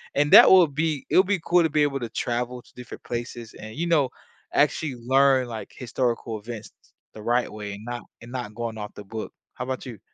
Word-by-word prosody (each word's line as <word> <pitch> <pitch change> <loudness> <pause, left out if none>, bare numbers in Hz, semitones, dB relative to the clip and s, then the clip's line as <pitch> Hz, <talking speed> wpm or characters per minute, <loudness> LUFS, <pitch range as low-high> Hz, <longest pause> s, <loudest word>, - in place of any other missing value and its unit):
and 145 +1 +2
that - - +11
would 175 -6 +6
be 155 -2 -1
it - - +3
would 185 - +6
be 200 -3 +1
cool 175 -1 +4
to 160 - +2
be 150 +1 +2
able 140 -2 0
to 115 - -4
travel 120 +2 -3
to - - -23
different 125 -2 -10
places 120 -1 -6
and, 110 +1 -9
you 170 +4 -2
know, 145 -6 +3 0.4
actually 145 -5 +1
learn, 130 +1 +3
like, 115 -2 -7
historical 120 -3 -2
events 110 0 -8 0.4
the 110 - -10
right 120 +2 +1
way 105 -1 -6
and 100 - -9
not 120 0 -5 0.2
and 120 +1 -11
not 125 -5 -5
going 115 -2 -4
off 105 0 -6
the 105 - -9
book. 110 +2 -6 0.2
How 125 - -4
'bout 130 +1 -4
you? 115 -6 -8
125 Hz, 225 wpm, -25 LUFS, 115-140 Hz, 0.4 s, that